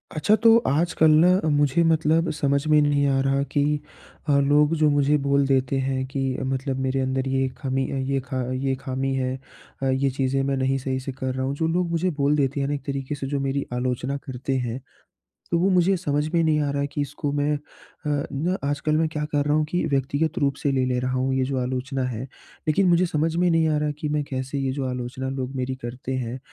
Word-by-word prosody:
अच्छा 205 +8 +3
तो 230 -1 +8
आजकल 160 +2 +3
ना 180 - +6 0.2
मुझे 145 +1 +2
मतलब 160 +1 +2
समझ 140 -1 0
में 155 0 +5
नहीं 145 -1 +2
आ 135 -1 +2
रहा 135 0 +1
कि 145 - +3 0.7
अ, - - +4
लोग 145 +2 +3
जो 155 -1 +3
मुझे 145 +1 +3
बोल 140 0 +2
देते 135 0 +1
हैं 130 0 -1
कि 135 +1 -4 0.3
मतलब 135 0 -2
मेरे 130 0 0
अंदर 130 0 -1
ये 135 0 +1
ख़ामी 135 -1 -1 0.2
ये 135 0 +1
ख़ा 130 -2 -2 0.4
ख़ामी 135 +1 -2
है 130 -1 -1 0.6
ये, 135 +1 +1
चीज़ें 135 0 0
मैं 135 0 0
नहीं 130 +1 +1
सही 130 0 -2
से 130 +1 -5
कर 130 0 -3
रहा 130 0 -1
हूँ 135 +1 -2
जो 160 +2 0
लोग 175 +1 0
मुझे 170 +2 +1
बोल 145 +1 +2
देते 140 0 0
हैं 140 - 0
ना 145 - -1
एक 145 - -3
तरीके 140 0 -3
से 135 -1 -5
जो 140 +1 -1
मेरी 135 0 -1
आलोचना 125 +2 -2
करते 130 +1 -3
हैं 120 +2 -4 0.7
तो 170 - +2
वो 180 +3 +2
मुझे 185 +1 +3
समझ 150 -4 -1
में 170 - +4
नहीं 155 -1 +2
आ 145 -1 0
रहा 140 - -1
है - - 0
कि 145 - -2
इसको 145 +1 -3
मैं 145 +1 +1
अ, 150 +3 -4
आजकल 150 +1 0
मैं 160 0 +2
क्या 150 -1 -3
कर 145 -1 +2
रहा 150 +1 +1
हूँ 155 - +2
कि 175 +3 -1
व्यक्तिगत 140 +3 0
रूप 140 -1 +1
से 140 - +1
ले 130 -1 +1
ले 125 -1 0
रहा 130 0 -2
हूँ 130 +1 0
ये 130 0 +1
जो 130 0 -2
आलोचना 130 +2 -2
है। 120 -1 -4 0.5
लेकिन 185 +5 +3
मुझे 175 +1 +4
समझ 160 0 0
में 180 +1 +3
नहीं 165 -1 +3
आ 155 - +1
रहा 150 0 0
कि 155 - -2
मैं 150 0 0
कैसे 135 0 -4
ये 135 -1 -1
जो 140 0 -3
आलोचना 125 +1 -4
लोग 135 0 -4
मेरी 130 0 -2
करते 125 +2 -5
हैं 125 0 -4
140 Hz, 230 wpm, -24 LUFS, 130-150 Hz, 0.7 s, तो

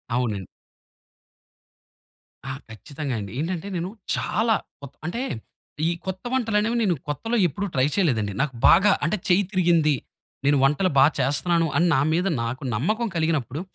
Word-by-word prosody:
అవునండి. 110 -7 -1 2.0
ఆ! - - -2 0.2
ఖచ్చితంగా 140 +4 -5
అండి! 100 -2 -6
ఏంటంటే 175 +3 -3
నేను, 175 +2 -2 0.3
చాలా 220 +3 +1 0.3
కొత్ 140 -2 -11
అంటే 230 +9 -3 0.7
ఈ - - +1
కొత్త 190 0 -5
వంటలనేవి 225 -2 +1
నేను 185 -5 +2
కొత్తలో 225 - -2
ఎప్పుడూ 195 +6 -4
ట్రై 130 0 +3
చేయలేదండి. 120 - +1
నాకు 145 -2 -1
బాగా 205 +1 +6
అంటే 190 +6 0
చెయ్యి 185 +2 +4
తిరిగింది, 170 -5 +3 0.5
నేను 145 0 +4
వంటలు 150 +7 +3
బాగా 140 +3 +6
చేస్తున్నాను! 165 +5 +1
అని 170 +3 +3
నా 135 - +3
మీద 180 +4 +1 0.2
నాకు 125 +5 -4
నమ్మకం 215 - 0
కలిగినప్పుడు, 160 -3 -1
165 Hz, 140 wpm, -24 LUFS, 135-195 Hz, 2.0 s, బాగా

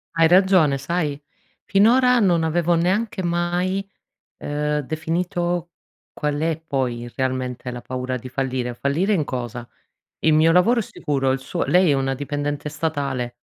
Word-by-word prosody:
Hai 165 0 +5
ragione, 180 -5 +4
sai? 145 0 -2 0.4
Finora 245 +5 +4
non 175 -6 +3
avevo 170 +2 +1
neanche 190 +3 0
mai, 175 +3 -1 0.5
ehm, 150 0 -2
definito 175 +3 -2 0.4
qual 150 -1 -2
è 160 0 -1
poi 125 -5 -2
realmente 130 -1 -2
la 120 0 -6
paura 125 +1 -4
di 125 - -9
fallire. 130 -2 -2
Fallire 160 - 0
in 165 -7 +1
cosa? 120 -2 -5 0.5
Il 160 - +3
mio 160 +2 +5
lavoro 225 +8 +4
è - - -1
sicuro, 140 -7 -1
il 135 - -1
suo 150 +6 -3
lei 180 -1 +4
è - - +4
una 135 -1 0
dipendente 145 +1 -3
statale, 145 -6 -3
155 Hz, 145 wpm, -22 LUFS, 135-175 Hz, 0.5 s, Hai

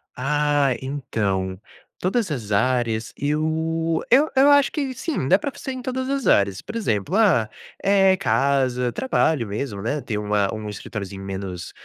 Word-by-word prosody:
Ah, 145 0 +1
então, 100 -9 -2 0.4
todas 195 +2 0
as 115 -7 -4
áreas 115 +1 0
eu 160 +2 -1
eu 280 +5 +5
eu 270 +2 +6
acho 285 -3 +5
que 275 -4 -2
sim, 255 - -3
dá 190 - +5
para 285 - -3
fazer 275 0 -6
em 260 -1 -6
todas 260 0 -3
as 275 -2 -1
áreas, 100 -1 +3
por 220 - -9
exemplo, 155 - -1
ah, 175 - +3 0.3
eh, 195 -1 +4
casa, 130 - +1
trabalho 160 - +1
mesmo, 100 0 -4
né, 140 +8 -2
tem 115 -4 -3
uma 105 -1 0
um 110 -1 -5
escritóriozinho 100 -2 -6
menos 95 -2 -6
140 Hz, 155 wpm, -23 LUFS, -, 0.4 s, eu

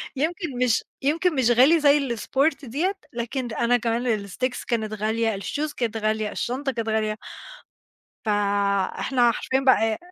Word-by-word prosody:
يمكن 315 0 -2
مش 230 - +2 0.2
يمكن 320 +5 +1
مش 245 -3 +3
غالي 275 +8 +6
زي 285 -4 +3
الsport 275 +6 0
دِيَّة، 315 - -1 0.2
لكن 240 +2 -3
أنا 245 +2 +2
كمان 230 -3 -1
الsticks 250 +6 -3
كانت 220 -2 -1
غالية، 220 0 0
الshoes 295 +7 -3
كانت 230 -3 -1
غالية، 215 -1 -1
الشنطة 270 +3 -2
كانت 230 -3 -3
غالية، 215 -1 0 1.1
فإحنا 205 +4 +1
حرفيًا 260 +3 -1
بقى 225 -5 +3
ي - - -4
240 Hz, 140 wpm, -24 LUFS, 220-270 Hz, 1.1 s, غالي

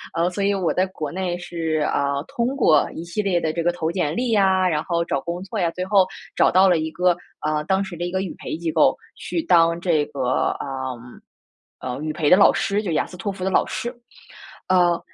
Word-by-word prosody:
呃， 170 +1 +2
所 200 +2 -3
以 200 - +2
我 180 -4 0
在 185 +1 +1
国 155 -6 -6
内 180 -1 -2
是， 165 -3 -2
啊， 140 0 0
通 235 0 -1
过 155 - +4
一 165 - -5
系 170 +5 -3
列 195 -4 +1
的 160 -2 -2
这 170 - -2
个 175 - +2
投 165 -2 -2
简 170 -4 -1
历 245 +1 -1
呀， 190 -3 +3
然 155 -3 0
后 170 -1 -1
找 140 - -1
工 175 +4 -5
作 210 +2 -5
呀， 175 -3 +2
最 180 +2 -4
后 190 -1 +4 0.3
找 - - +4
到 190 +2 +5
了 175 -3 +3
一 160 0 -3
个， 180 0 +2 0.3
呃， 155 0 0
当 190 +1 +1
时 190 -3 -7
的 175 +1 -4
一 175 - -4
个 190 - -1
语 185 - -5
培 - - -5
机 165 -1 -2
构， - - +3 0.2
去 - - -4
当 170 -1 +4
这 170 -4 +1
个， 130 -2 -1
嗯， 130 -3 -6 0.6
呃， 125 +2 -5
语 155 0 -2
陪 150 -1 -1
的 180 - +8
老 200 - +6
师， 205 +1 0
就 195 - -3
雅 - - +1
思 - - -12
托 200 +3 -3
福 190 -1 -7
的 190 - +1
老 - - +2
师。 240 +2 -4 0.8
呃， 175 -2 +3
175 Hz, 255 characters per minute, -22 LUFS, 155-190 Hz, 0.8 s, 的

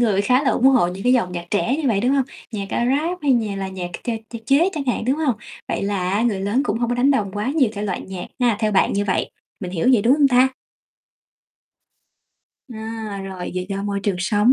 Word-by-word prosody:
người 210 -5 +3
khá 250 +6 +3
là 280 - +2
ủng 255 - +2
hộ 255 -9 +5
những 185 +2 -6
cái 250 - +3
dòng 230 -8 +1
nhạc 175 -1 -4
trẻ 235 +6 +1
như 300 -3 0
vậy, 205 -4 +2
đúng 245 - +2
hông? 275 -1 +2 0.3
Nhạc, 200 -2 -3
a, 240 - 0
Rap 310 +8 0
hay 285 -2 +3
nhà 220 -5 0
là 195 -1 -3
nhạc 185 -2 -5
ch - - -1 0.2
ch 235 - -5
chế 295 +7 +4
chẳng 300 -5 -3
hạn, 245 - 0
đúng 260 +4 +1
hông? 300 -6 +1 0.3
Vậy - - -2
là 195 -2 -1
á, 205 +3 +1
người 220 -5 0
lớn 205 +7 +1
cũng 225 -6 -1
hông 235 0 0
có 245 - 0
đánh 260 +3 +3
đồng 215 -8 +1
quá 210 +2 -3
nhiều 270 -7 +4
thể 205 -1 -5
loại 200 -3 -2
nhạc 185 -2 -7
ha, 240 -4 +3
theo 215 -1 +1
bạn 190 - +3
như 200 +1 0
vậy, 190 -2 -1 0.3
mình 180 - -5
hiểu 180 +6 0
vậy 225 -5 +4
đúng 245 +5 +5
hông 290 -1 +4
ta? 255 0 +5 2.3
À, 220 -2 -5
rồi 190 -2 -6
vậy 185 0 -3
do 195 0 -3
môi 200 -1 -2
trường 200 -2 -1
sống 210 +6 +3
220 Hz, 250 wpm, -21 LUFS, 195-255 Hz, 2.3 s, hộ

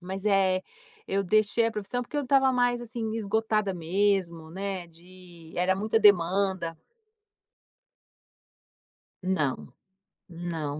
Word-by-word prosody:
Mas, 190 +2 -6
eh, 190 -2 +3 0.4
eu 195 +1 0
deixei 215 +4 +2
a 230 - -1
profissão, 215 +4 -3
porque 250 - -7
eu 290 - +1
estava 265 0 +3
mais, 245 -1 +2
assim, 230 -2 -4
esgotada 215 -1 0
mesmo, 175 -2 0
né, 190 0 -4
de 170 -1 -15
era 180 +2 +2
muita 215 +3 +1
demanda. 185 -3 +3 2.5
Não, 155 -8 -1 0.6
não, 165 -4 -4
195 Hz, 110 wpm, -27 LUFS, 175-220 Hz, 2.5 s, eh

